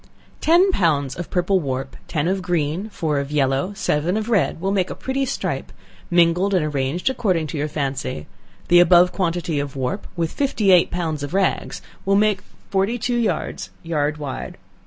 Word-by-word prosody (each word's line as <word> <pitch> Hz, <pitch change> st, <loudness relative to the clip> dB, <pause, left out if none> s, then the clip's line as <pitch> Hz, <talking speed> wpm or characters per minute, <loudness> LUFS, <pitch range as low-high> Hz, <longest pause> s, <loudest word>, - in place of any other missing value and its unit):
Ten 350 Hz, +5 st, +5 dB
pounds 145 Hz, -, +1 dB
of 175 Hz, -, -6 dB
purple 185 Hz, +1 st, +1 dB
warp, 135 Hz, -3 st, -4 dB
ten 155 Hz, -1 st, -1 dB
of 190 Hz, +1 st, 0 dB
green, 175 Hz, +3 st, -1 dB
four 155 Hz, -8 st, -1 dB
of 140 Hz, +1 st, -4 dB
yellow, 140 Hz, +4 st, +1 dB
seven 175 Hz, 0 st, 0 dB
of 220 Hz, +1 st, -3 dB
red, 205 Hz, -7 st, +1 dB
will 190 Hz, +3 st, -1 dB
make 190 Hz, -2 st, +1 dB
a -, -, -5 dB
pretty 265 Hz, +1 st, -2 dB
stripe, 275 Hz, -, -3 dB, 0.4 s
mingled 175 Hz, +3 st, +3 dB
and 170 Hz, -4 st, +2 dB
arranged 145 Hz, +3 st, -2 dB
according 200 Hz, -11 st, +1 dB
to 155 Hz, +1 st, -5 dB
your 150 Hz, -, 0 dB
fancy; 135 Hz, -, -3 dB, 0.4 s
the 175 Hz, -, +6 dB
above 175 Hz, +1 st, +6 dB
quantity 170 Hz, -4 st, -1 dB
of 140 Hz, 0 st, -4 dB
warp, 135 Hz, +9 st, -3 dB
with 165 Hz, -2 st, -1 dB
fifty 250 Hz, -8 st, +1 dB
eight 180 Hz, -2 st, +6 dB
pounds 160 Hz, -4 st, -2 dB
of 145 Hz, +5 st, -4 dB
rags 195 Hz, -1 st, 0 dB, 0.2 s
will 195 Hz, +1 st, +2 dB
make 205 Hz, -2 st, +3 dB, 0.3 s
forty 195 Hz, +5 st, +1 dB
two 245 Hz, +1 st, -1 dB
yards, 230 Hz, -3 st, -2 dB
yard 150 Hz, -2 st, -1 dB
wide. 145 Hz, -3 st, -6 dB
175 Hz, 180 wpm, -22 LUFS, 150-195 Hz, 0.4 s, the